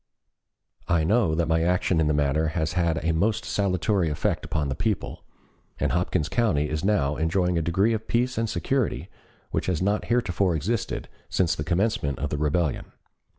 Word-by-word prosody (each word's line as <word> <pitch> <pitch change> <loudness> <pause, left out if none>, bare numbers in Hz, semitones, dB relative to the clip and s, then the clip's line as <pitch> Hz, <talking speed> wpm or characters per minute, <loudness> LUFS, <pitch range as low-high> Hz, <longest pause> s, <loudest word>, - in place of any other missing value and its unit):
"I 85 -2 +2
know 100 -2 +2
that 85 0 0
my 80 0 +2
action 90 0 +1
in 80 - +2
the 75 - +2
matter 75 +2 +1
has 80 -1 0
had 85 -3 0
a 80 - +3
most 100 +7 0
salutary 90 -2 +1
effect 75 - -1
upon 75 -2 -2
the 70 - -1
people, - - -2 0.6
and - - +1
Hopkins 90 -3 0
County 80 -9 +1
is 75 +1 -2
now 75 -9 +1
enjoying 90 +2 +1
a 85 - +1
degree 95 +8 +2
of 110 0 -4
peace 125 +2 +1
and 115 0 -1
security 130 +2 -1 0.4
which - - -1
has 90 -4 0
not 100 +3 0
heretofore 100 -7 +1
existed 105 +8 -2 0.2
since 90 -3 +1
the 75 - -3
commencement 85 - 0
of 70 +1 -3
the 75 - -2
rebellion. 75 0 -1
85 Hz, 180 wpm, -25 LUFS, 80-100 Hz, 0.6 s, a